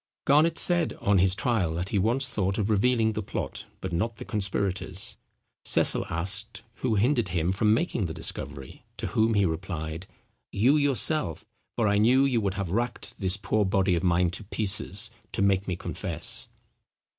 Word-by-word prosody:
Garnet 155 +4 +4
said 175 -2 +3
on 100 -1 +1
his 95 +1 +3
trial 100 - 0
that 90 +3 -3
he 105 - 0
once 120 +7 +3
thought 100 -5 -1
of 105 0 0
revealing 110 +1 +2
the 110 - -3
plot, 100 - -5
but 95 -2 -5
not 110 +7 -1
the - - -9
conspirators. 100 -2 -2 0.5
Cecil - - +5
asked 100 +7 -2
who 120 -4 -1
hindered 120 +2 +2
him 85 0 -1
from 105 +3 +1
making 115 - 0
the 80 - -6
discovery; 70 -4 -5
to - - -5
whom 110 0 +1
he 100 -1 +3
replied, 80 0 -4 0.4
"You, 120 +9 +3
yourself; 140 - +2 0.3
for 115 -3 +1
I 100 0 +2
knew 125 +5 +4
you 125 -4 +1
would 100 -2 -2
have 95 -4 -3
racked 120 +5 -3
this 95 0 +1
poor 105 +1 0
body 95 -1 +1
of 85 - 0
mine 90 -1 +2
to 100 - -7
pieces, 105 0 -2 0.2
to - - 0
make 100 -1 +1
me 90 - -1
confess." 85 -1 -3
100 Hz, 175 wpm, -26 LUFS, 90-115 Hz, 0.5 s, Cecil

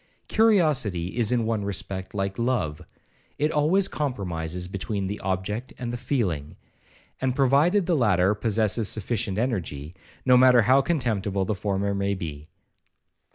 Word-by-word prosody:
Curiosity 145 - +2
is 120 -2 +1
in 120 -2 +1
one 110 -2 -1
respect 95 -1 -3
like 95 0 -2
love, 115 -12 -1 0.6
it 150 +2 +1
always 165 +6 +2
compromises 90 - -3
between 100 +1 -3
the 100 +2 -4
object 100 +5 -3
and 120 -2 -4
the - - -1
feeling; 105 - -2 0.7
and 130 -1 0
provided 145 +9 +3
the 175 -1 +1
latter 100 - +3
possesses 110 0 +1
sufficient 105 -2 -2
energy, 85 - -3 0.3
no 125 -1 +6
matter 125 -2 +6
how 130 +5 +5
contemptible 110 - -1
the 110 - -1
former 100 0 -1
may 100 0 -1
be. 75 -5 -7
105 Hz, 140 wpm, -25 LUFS, 95-130 Hz, 0.7 s, no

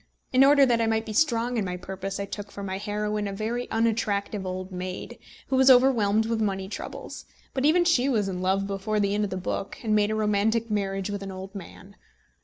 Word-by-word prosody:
In 260 +1 +6
order 280 0 +6
that 235 -3 +2
I 225 - +2
might 220 0 0
be 215 - -5
strong 240 -2 +1
in 210 - 0
my 180 -1 -3
purpose, 190 +1 -5
I 200 - -2
took 205 +1 -7
for 200 - -7
my 190 0 -3
heroine 210 0 -2
a - - -3
very 225 +5 -3
unattractive 210 -3 0
old 185 +1 -5
maid, 185 0 -6 0.3
who 265 - +1
was 265 0 +5
overwhelmed 230 -5 +5
with 225 0 -1
money 195 -2 -1
troubles; 200 - -7 0.3
but 265 +1 0
even 345 +3 +4
she 280 -6 +3
was 215 -6 +1
in 180 -2 -3
love 190 +1 +1
before 200 +2 -2
the 200 -1 +1
end 210 0 +1
of - - -5
the 185 - -4
book, 190 +1 -4
and 215 -2 +1
made 210 -1 +3
a 215 - -1
romantic 215 +2 +1
marriage 195 -1 -1
with 200 -1 -4
an 195 -1 -6
old 190 +1 -8
man. 195 0 -11
210 Hz, 225 wpm, -26 LUFS, 195-230 Hz, 0.3 s, In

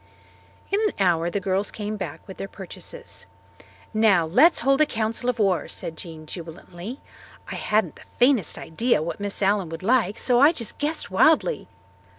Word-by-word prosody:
In 400 +2 +2
an 425 -2 +1
hour 175 -3 +2
the 200 - -1
girls 195 +1 0
came 210 0 -4
back 200 - -7
with 190 - -9
their 195 - -5
purchases. 340 - -9 0.7
"Now, 215 -6 +4
let's 260 - +5
hold 275 +4 +3
a 305 - +5
council 225 +1 -1
of 250 - -1
war," 195 -5 +1
said 165 - -4
Jean 160 -1 -9
jubilantly. 175 - -8 0.5
"I - - -4
hadn't 210 -6 0
the - - -15 0.2
faintest 245 - +3
idea 225 0 +1
what 170 - -4
Miss 205 0 -3
Allen 195 -3 +2
would 165 +2 -7
like 220 -2 +2
so 245 -2 +2
I 290 +5 +7
just 230 -9 -5
guessed 305 -6 -2
wildly. 315 - +3
210 Hz, 170 wpm, -24 LUFS, 180-250 Hz, 0.7 s, I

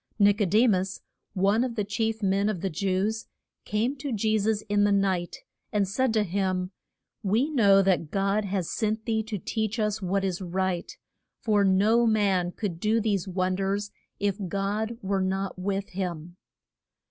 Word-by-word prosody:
Nic 205 0 +4
o - - +4
de 215 +7 +4
mus, 190 -4 +1 0.4
one 200 +5 +3
of 250 -2 -3
the 210 - 0
chief 220 +2 -2
men 195 +2 +2
of 190 -6 -3
the 195 - -2
Jews, 195 +6 -1 0.4
came 225 +6 0
to 275 +1 -4
Je 215 0 +1
sus 215 +1 0
in 205 -1 +1
the 205 - +3
night, 190 -3 0 0.3
and 205 -2 +1
said 250 +6 +1
to 215 - +3
him, 185 -1 -1 0.5
We 230 +9 +1
know 200 -8 +5
that 180 -5 +1
God 195 +3 +1
has 190 -3 -2
sent 220 0 -1
thee 220 -1 +1
to 220 -1 -4
teach 220 +4 -2
us 210 -1 -1
what 195 +1 0
is 190 -1 -2
right, 185 0 -2 0.5
for 210 -3 +2
no 210 +5 +4
man 195 -5 +2
could 180 -4 -4
do 215 +4 +2
these 205 -4 0
won 185 0 0
ders 195 +2 -2 0.3
if 200 0 0
God 205 +4 -2
were 195 0 0
not 190 0 -2
with 195 +1 -2
him. 175 -2 -5
200 Hz, 175 wpm, -27 LUFS, 190-215 Hz, 0.5 s, know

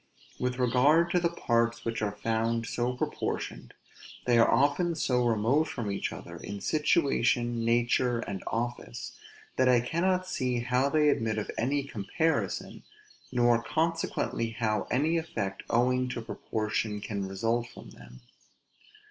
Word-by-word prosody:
With 125 0 -1
regard 140 +7 +4
to 180 - +3
the 170 -1 +1
parts 115 -7 0
which 115 -1 -2
are 105 -1 0
found 115 +2 0
so 120 +2 -1
proportioned, 125 - -4 0.5
they 120 -1 +4
are 115 - +5
often 145 +5 +2
so 125 -5 +1
remote 120 +7 +2
from 110 -7 -4
each 100 - -2
other, - - -8
in 100 - -6
situation, 125 - +1
nature, 120 +1 +2
and 100 -4 -5
office, 120 0 -4 0.5
that 130 0 +4
I 125 -1 +6
cannot 180 +8 0
see 125 -8 -1
how 125 +3 +1
they 150 0 +4
admit 110 -5 0
of 105 - -3
any 140 +4 0
comparison, 140 - -2 0.5
nor 120 -2 +3
consequently 160 -6 -1
how 110 -2 -1
any 155 +6 +2
effect 100 - -3
owing 125 +2 +2
to 120 - -4
proportion 110 -1 -2
can 100 -2 -4
result 115 +5 -1
from - - -12
them. 60 0 -14
120 Hz, 140 wpm, -29 LUFS, 115-140 Hz, 0.5 s, I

